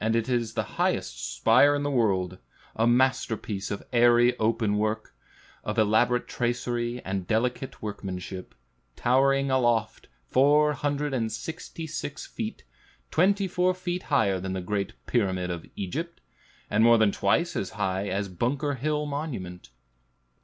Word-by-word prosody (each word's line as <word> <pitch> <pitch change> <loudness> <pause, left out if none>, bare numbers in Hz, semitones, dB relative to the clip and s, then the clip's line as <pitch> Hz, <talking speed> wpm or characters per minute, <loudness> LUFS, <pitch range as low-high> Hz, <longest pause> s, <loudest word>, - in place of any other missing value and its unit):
It 115 0 +1
is 120 -3 -1
the - - 0 0.2
highest - - -1
spire 145 - +5
in 145 - -1
the 145 - -1
world, 95 -8 +1 0.4
a 115 +1 +2
masterpiece 120 -5 +1
of 100 - -4
airy 120 +1 +5
open 110 -2 +1
work, 110 +1 -2 0.5
of 105 +2 -3
elaborate 110 +3 +3
tracery 120 0 -2
and 95 -1 -3
delicate 125 +3 -1
workmanship, 95 -3 -6 0.4
towering 135 +2 +2
aloft 120 -4 +1 0.2
four 150 - +4
hundred 145 0 -2
and 115 -4 -1
sixty 165 0 -6
six 160 - -5
feet, - - -6 0.5
twenty 195 +4 +3
four 180 0 +1
feet 180 0 -3
higher 110 -10 +2
than 95 +1 -4
the 95 - -3
great 100 +2 -2
Pyramid 95 -6 0
of 85 -2 -6
Egypt, 160 - -4 0.5
and 105 +2 +2
more 115 0 +7
than 110 -2 +4
twice 165 - +1
as 95 - -2
high 95 0 -1
as 100 0 -1
Bunker 130 - -1
Hill 150 +3 -1
Monument. 130 - -5
120 Hz, 140 wpm, -27 LUFS, 100-140 Hz, 0.5 s, more